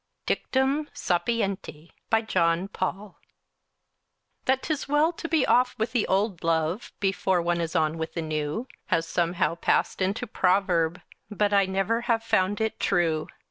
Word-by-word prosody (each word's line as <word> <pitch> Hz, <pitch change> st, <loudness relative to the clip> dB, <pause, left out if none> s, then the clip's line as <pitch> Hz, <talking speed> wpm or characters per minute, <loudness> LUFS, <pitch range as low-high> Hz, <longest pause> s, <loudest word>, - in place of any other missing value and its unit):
DICTUM 270 Hz, +3 st, 0 dB
SAPIENTI 195 Hz, -5 st, -2 dB, 0.2 s
BY 225 Hz, 0 st, +3 dB
JOHN 170 Hz, -3 st, +1 dB
PAUL 195 Hz, +1 st, -4 dB, 1.3 s
That 260 Hz, 0 st, +2 dB
'tis 305 Hz, -2 st, -2 dB
well 295 Hz, +3 st, +3 dB
to 330 Hz, -, -6 dB
be 315 Hz, -4 st, +3 dB
off 250 Hz, 0 st, +3 dB
with 220 Hz, 0 st, -1 dB
the 235 Hz, -3 st, +1 dB
old 195 Hz, -1 st, 0 dB
love 165 Hz, +5 st, 0 dB
Before 190 Hz, -2 st, +1 dB
one 170 Hz, 0 st, 0 dB
is 165 Hz, -1 st, -3 dB
on 160 Hz, +1 st, +1 dB
with 160 Hz, -, -4 dB
the 165 Hz, -, -1 dB
new 155 Hz, -, -3 dB, 0.2 s
Has 165 Hz, -2 st, +1 dB
somehow 170 Hz, 0 st, 0 dB
passed 170 Hz, -, 0 dB
into 195 Hz, +4 st, 0 dB
a -, -, -16 dB
proverb, 180 Hz, -4 st, +1 dB, 0.3 s
But 205 Hz, -1 st, 0 dB
I 200 Hz, -1 st, +4 dB
never 195 Hz, +5 st, 0 dB
have 225 Hz, -1 st, +2 dB
found 200 Hz, -2 st, +1 dB
it 220 Hz, 0 st, -1 dB
true. 165 Hz, -4 st, +1 dB
195 Hz, 155 wpm, -26 LUFS, 170-225 Hz, 1.3 s, I